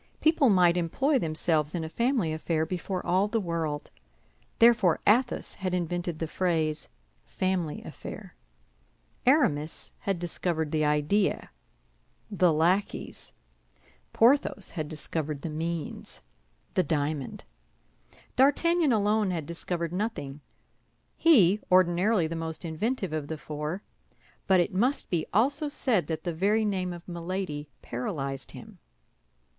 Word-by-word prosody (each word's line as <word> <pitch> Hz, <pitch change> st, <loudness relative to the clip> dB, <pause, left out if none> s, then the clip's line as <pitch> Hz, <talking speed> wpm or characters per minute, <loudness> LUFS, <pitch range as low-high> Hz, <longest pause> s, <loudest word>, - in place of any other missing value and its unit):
People 310 Hz, -4 st, +4 dB
might 180 Hz, -3 st, +4 dB
employ 265 Hz, -, +1 dB
themselves 155 Hz, -2 st, 0 dB
in 170 Hz, -, -2 dB
a -, -, -4 dB
family 235 Hz, -, 0 dB
affair 160 Hz, 0 st, -1 dB
before 180 Hz, +2 st, -4 dB
all 185 Hz, +3 st, +2 dB
the 225 Hz, +2 st, 0 dB
world. 165 Hz, -5 st, -3 dB, 0.7 s
Therefore 230 Hz, -7 st, +5 dB
Athos 240 Hz, +5 st, +2 dB
had 185 Hz, -2 st, -2 dB
invented 175 Hz, -1 st, -2 dB
the 165 Hz, -, -2 dB
phrase, 160 Hz, -3 st, -1 dB, 0.3 s
family 185 Hz, -5 st, -2 dB
affair. -, -, -9 dB, 0.9 s
Aramis 165 Hz, -, +2 dB
had 195 Hz, -2 st, -1 dB
discovered 170 Hz, -2 st, -1 dB
the 155 Hz, -1 st, +1 dB
idea, 150 Hz, +7 st, +1 dB, 0.8 s
the 180 Hz, -4 st, +3 dB
lackeys. 175 Hz, +6 st, 0 dB, 0.8 s
Porthos 235 Hz, -4 st, +3 dB
had 155 Hz, -4 st, -4 dB
discovered 155 Hz, -2 st, -4 dB
the 165 Hz, -, -3 dB
means, 165 Hz, -, -5 dB, 0.5 s
the -, -, +3 dB
diamond. 150 Hz, -3 st, -2 dB, 0.9 s
D'Artagnan 305 Hz, +4 st, +3 dB
alone 210 Hz, -1 st, +2 dB
had 165 Hz, -4 st, -2 dB
discovered 170 Hz, 0 st, -3 dB
nothing—he, 200 Hz, -, 0 dB
ordinarily 185 Hz, +2 st, +4 dB
the 165 Hz, +1 st, -3 dB
most 160 Hz, 0 st, -5 dB
inventive 190 Hz, +3 st, -2 dB
of 155 Hz, -2 st, -3 dB
the 160 Hz, -, -4 dB
four; 150 Hz, +5 st, -5 dB, 0.6 s
but 190 Hz, -2 st, +5 dB
it 175 Hz, +3 st, +1 dB
must 250 Hz, +9 st, 0 dB
be 170 Hz, -3 st, 0 dB
also 280 Hz, -, +1 dB
said 250 Hz, -, 0 dB
that 160 Hz, -1 st, -3 dB
the 175 Hz, -, -2 dB
very 205 Hz, +6 st, +2 dB
name 185 Hz, -3 st, -1 dB
of 175 Hz, -1 st, -9 dB
Milady 170 Hz, -4 st, -4 dB
paralyzed 135 Hz, +2 st, -4 dB
him. -, -, -12 dB
175 Hz, 120 wpm, -28 LUFS, 160-205 Hz, 0.9 s, Therefore